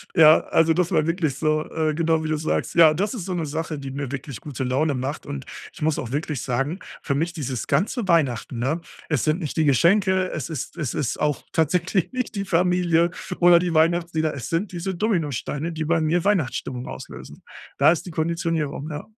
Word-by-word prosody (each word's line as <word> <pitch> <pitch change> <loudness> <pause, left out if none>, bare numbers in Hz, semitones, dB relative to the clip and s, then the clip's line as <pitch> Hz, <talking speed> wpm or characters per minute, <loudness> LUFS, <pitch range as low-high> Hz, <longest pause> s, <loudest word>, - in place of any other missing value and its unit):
Ja, 155 -2 +8
also 165 0 +3
das 180 +1 0
war 155 -4 +2
wirklich 165 -4 0
so. 155 0 +1
Äh, 155 -1 0
genau, 160 0 +1
wie 155 - -3
du 155 - +1
sagst. 155 - -2
Ja, 160 -2 +7
das 200 +8 -1
ist 210 -9 -5
so 190 - -3
'ne 170 -3 -2
Sache, 155 +1 -3
die 135 -1 -6
mir 140 -1 -4
wirklich 135 -4 -6
gute 135 -3 -5
Laune 140 +4 +1
macht. 135 +4 -4
Und 140 -2 -6 0.3
ich - - -14
muss 155 -1 +1
auch 120 - -5
wirklich 145 -1 -2
sagen, 135 +8 -2 0.2
für 140 - 0
mich 165 +3 -1
dieses 130 - -4
ganze 220 +2 0
Weihnachten, 140 -8 +1
ne, 150 +7 -1 0.3
es 150 -6 +1
sind 155 +3 +1
nicht 155 -1 -4
die 160 - +3
Geschenke, 185 - +3
es 155 -1 -4
ist 160 - -5
es 150 -8 -2
ist 140 -6 -2
auch 150 -2 0
tatsächlich 175 +3 +1
nicht 255 -3 -3
die 200 -1 -2
Familie 175 -1 +2 0.3
oder 175 -1 +7
die 175 -1 -1
Weihnachtslieder. 160 -1 +2
Es 130 -4 -6
sind 175 +5 -1
diese 180 +1 -4
Dominosteine, 165 - -1
die 160 -1 -3
bei 165 +1 +2
mir 165 +2 +1
Weihnachtsstimmung 135 -9 -1
auslösen. 65 +1 -9 0.3
Da - - +6
ist 170 - -1
die 180 - -7
Konditionierung, 160 -2 -2
ja. 150 0 -6
160 Hz, 205 wpm, -23 LUFS, 145-175 Hz, 0.3 s, Ja